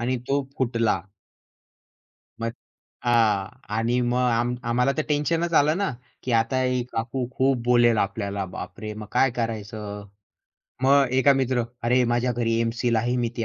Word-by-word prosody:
आणि 125 +2 0
तो 140 +1 +2 0.2
फुटला. 115 -6 +1 1.4
मग 115 0 -1 0.5
हां. 110 -5 +3 0.3
आणि 115 +3 +1
मग 120 0 0
आम्ही 120 +1 +1
आम्हाला 125 +3 +2
तर - - +2
टेन्शनच 165 +3 0
आलं 155 +1 +4
ना, 200 -1 0 0.3
की 125 - -2
"आता 115 +3 +2
एक 125 -1 -1
काकू 125 +3 -2
खूप 135 0 +3
बोलेल 120 -2 +4
आपल्याला, 100 -1 -1
बापरे! 100 +4 -7
मग 105 0 -8
काय 135 -2 +3
करायचं?" 105 -3 -5 0.8
मग 140 +1 +5
एका 130 +2 +5
मित्र, 130 -2 +1 0.2
"अरे 125 +2 +3
माझ्या 120 +1 +1
घरी 115 -1 0
एम-सील 115 +1 0
आहे, 120 +3 0
मी 120 -1 0
ते 115 - -1
120 Hz, 150 wpm, -24 LUFS, 115-130 Hz, 1.4 s, मग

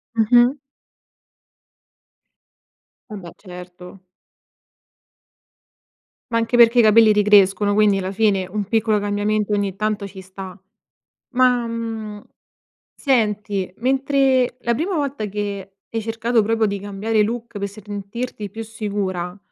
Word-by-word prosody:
Mh-mh. 240 +4 +4 2.5
Vabbè, 195 -5 -8
certo. 180 0 -12 2.3
Ma 230 - +1
anche 230 +1 0
perché 235 +1 +6
i - - +9
capelli 220 0 +6
ricrescono, 205 -1 +4
quindi 205 -2 +3
la 190 +1 -4
fine 200 -2 +1
un 210 -1 -2
piccolo 220 0 +1
cambiamento 205 +1 -1
ogni 200 -2 -1
tanto 215 -1 -2
ci 195 0 -12
sta, 190 0 -10 0.7
ma, 250 -2 +3
mhmm, 225 -2 -5 0.7
senti, 210 -7 -1
mentre 265 0 +1
la 235 - +1
prima 345 - -2
volta 280 -7 -2
che 200 -1 -5
hai 225 -1 -4
cercato 225 +1 0
proprio 225 +1 +1
di 200 -1 -3
cambiare 205 +2 -1
look 235 +1 -4
per 200 0 -3
sentirti 205 +2 -7
più 225 +3 -7
sicura 200 -5 -4
210 Hz, 115 wpm, -21 LUFS, 200-230 Hz, 2.5 s, i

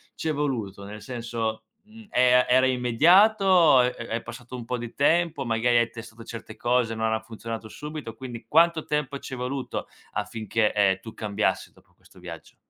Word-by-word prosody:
ci 160 - -5
è - - +1
voluto? 115 -9 -3
Nel 105 +2 -9
senso, 115 -3 -4 0.2
mhmm, 215 0 -16
e 125 0 +3
a 125 - +5
era 130 +1 +5
immediato 170 - +4
o 170 -9 +6
è 125 0 +1
è 115 -1 -5
passato 125 0 -9
un 120 -2 -7
po' 125 0 -3
di 120 -1 -8
tempo, 160 -1 +2
magari 120 +1 +2
hai 115 -1 +2
testato 115 0 -11
certe 115 0 -9
cose, 120 -2 0
non 110 0 0
han 110 - -1
funzionato 115 0 -7
subito, 150 -6 -7
quindi 120 -2 -8
quanto 165 0 +4
tempo 145 -2 -2
ci 130 - -7
è - - -9
voluto 130 +1 -4 0.3
affinché, 110 +1 -1
ehm, 95 -2 +2
tu 110 - -10
cambiassi 105 -2 -1
dopo - - -26
questo - - -23
viaggio? - - -10
120 Hz, 190 wpm, -25 LUFS, 115-140 Hz, 0.3 s, o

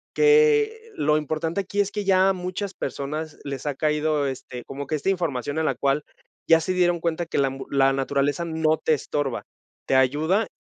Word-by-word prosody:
que 445 0 +4
lo 150 +1 +2
importante 160 +4 -2
aquí 200 +1 -1
es 200 - -2
que 210 -1 -3
ya 190 0 +4
muchas 185 +2 -4
personas 150 +4 -5
les 140 0 -6
ha 145 - -1
caído, 150 0 +1
este, 125 -2 -6
como 140 0 -6
que 155 - -1
esta 155 +6 -1
información 155 -5 -1
a - - 0
la - - +1
cual 140 +1 0 0.4
ya 165 0 +6
se 185 +3 -1
dieron 175 -1 +2
cuenta 170 0 -2
que - - -3
la 140 - +3
ambu 135 0 -8
la 135 -1 +3
naturaleza 140 +3 0
no 160 -1 +1
te 155 - +2
estorba, 145 -3 -3 0.4
te 135 - +1
ayuda 155 - +2
155 Hz, 190 wpm, -24 LUFS, 140-185 Hz, 0.4 s, ya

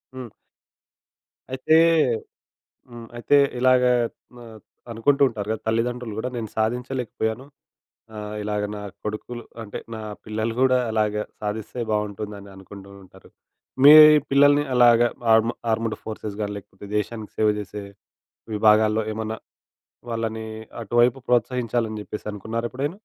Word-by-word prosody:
హ్మ్. 125 -3 -7 1.2
అయితే 130 +4 +2 1.1
హ్మ్. 120 -1 -10
అయితే 130 +4 +2 0.2
ఇలాగా 125 -1 +4 0.4
మ - - -12 0.5
అనుకుంటూ 140 +5 +2
ఉంటారు 105 -3 -6
కదా! 110 - -2
తల్లిదండ్రులు 115 0 -1
కూడా. 125 - -2
నేను 110 -2 -4
సాధించలేకపోయాను 120 0 -2 0.7
ఆహ్, 105 0 -6
ఇలాగ 105 0 -2
నా 105 - -6 0.2
కొడుకులు 115 +3 -6 0.2
అంటే 105 -2 -7 0.2
నా 110 - -6 0.3
పిల్లలు 110 +1 -2
కూడా 130 -1 +4
అలాగ 105 -1 0 0.3
సాధిస్తే 110 +3 -4
బాగుంటుందని 105 -1 -4
అనుకుంటూ 95 +1 -12
ఉంటారు. 95 - -18 0.5
మీ 145 - +10 0.4
పిల్లల్ని 145 +1 +5
అలాగ 120 -1 +6 0.3
ఆర్ 110 0 +6 0.3
ఆర్మ్డ్ 110 0 -1
ఫోర్సెస్ 110 -2 -6
కానీ 105 0 -2
లేకపోతే 100 0 -13
దేశానికి 110 +1 -4
సేవ 110 - +3
చేసే 105 0 -7 0.7
విభాగాల్లో 110 +1 +4
ఏమన్నా 110 0 -4 0.7
వాళ్ళని 110 -1 -3 0.4
అటువైపు 120 +4 +2
ప్రోత్సహించాలని 120 -2 0
చెప్పేసి 105 0 -8
అనుకున్నారా 115 +3 -4
ఎప్పుడైనా? 145 +8 -4
110 Hz, 115 wpm, -23 LUFS, 105-125 Hz, 1.2 s, మీ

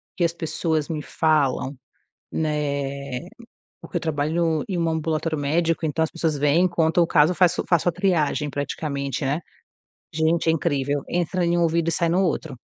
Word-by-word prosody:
que 175 - 0
as 170 0 +2
pessoas 160 -2 -1
me 155 -2 -2
falam, 145 -4 +1 0.6
né, 140 -4 -2 0.6
porque - - -7
eu - - +1
trabalho 160 +1 0
em 180 -3 -2
um 165 -1 +1
ambulatório 160 0 -1
médico, 165 +3 0
então 155 +1 0
as - - -3
pessoas 160 -2 -1
vêm, 155 +6 +3
contam 170 0 +2
o - - +3
caso 160 +2 +4
faço 180 -1 +3
eu - - -20
faço 175 0 +3
a - - +2
triagem 160 -5 +1
praticamente, 140 -1 -3
né, 145 +5 0 0.7
gente 160 +2 +1
é - - +6
incrível, 145 -3 0
entra 175 +1 0
em 170 0 +2
um - - +2
ouvido 165 0 +2
e - - 0
sai 170 +1 +1
no 180 +3 +2
outro. 155 -6 -2
160 Hz, 180 wpm, -23 LUFS, 145-170 Hz, 0.7 s, é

